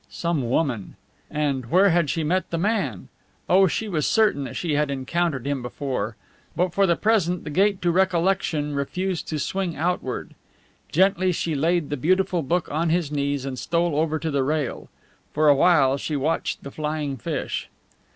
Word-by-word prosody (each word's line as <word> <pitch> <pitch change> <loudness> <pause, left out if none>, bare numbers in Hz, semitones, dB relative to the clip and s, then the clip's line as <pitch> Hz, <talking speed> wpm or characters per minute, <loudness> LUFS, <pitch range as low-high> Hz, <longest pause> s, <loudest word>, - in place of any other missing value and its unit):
Some 160 -8 -2
woman! 125 - -1 0.3
And 140 -4 -1
where 190 +4 +5
had 170 -3 +2
she 165 - -1
met 180 +4 0
the 170 - -2
man? 185 - -1 0.4
Oh, 190 +1 +5
she 220 +5 -2
was 155 -7 0
certain 210 -11 +2
that 125 - -7
she 170 -4 -2
had 150 0 +1
encountered 140 +1 -1
him 140 -2 -1
before! 125 -3 -3 0.4
But 180 -1 0
for 195 +1 +3
the 170 - +3
present 185 -5 +1
the 150 - -6
gate 195 +3 +2
to 175 - +3
recollection 175 -4 +1
refused 175 +5 -2
to 155 - -2
swing 180 +2 -2
outward. 165 -5 -2 0.6
Gently 185 +1 +3
she 165 -1 -2
laid 160 +1 0
the 145 - -1
beautiful 185 +4 +1
book 170 +4 0
on 160 +3 0
his 165 -3 0
knees 140 -2 -1
and 130 -2 -4
stole 170 -2 0
over 155 +1 +1
to 160 0 -3
the 140 -1 +1
rail. 150 -1 -2 0.4
For 155 0 +4
a 145 - +7
while 140 -4 +4
she 150 +2 -3
watched 150 +4 -1
the 140 - -7
flying 150 -2 -3
fish. 115 - -4
160 Hz, 180 wpm, -24 LUFS, 140-180 Hz, 0.6 s, a